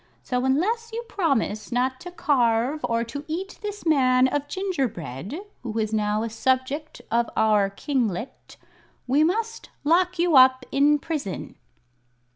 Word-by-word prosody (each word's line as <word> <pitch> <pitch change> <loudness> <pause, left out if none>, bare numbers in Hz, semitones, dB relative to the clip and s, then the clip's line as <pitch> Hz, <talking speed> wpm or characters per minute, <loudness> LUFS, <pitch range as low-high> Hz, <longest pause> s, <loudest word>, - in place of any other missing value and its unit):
So, 250 - -1
unless 440 - 0
you 465 +1 -4
promise 260 - -1
not 255 +2 0
to 355 - -8
carve 270 -4 +1
or 230 0 0
to 285 +5 -6
eat 365 +5 -5
this 415 -2 -6
man 255 -5 +4
of 290 +2 -2
gingerbread, 265 - -3 0.2
who 230 -3 -5
is 220 -1 -1
now 210 0 +1
a 230 - -3
subject 260 +6 -1
of 235 +1 +2
our 210 -2 +3
kinglet, 230 - -3 0.5
we 275 +4 +3
must 455 +7 -1
lock 360 +4 +2
you 340 -2 +2
up 260 0 +6
in 290 +2 +4
prison." 290 - -4
265 Hz, 140 wpm, -24 LUFS, 230-330 Hz, 0.5 s, up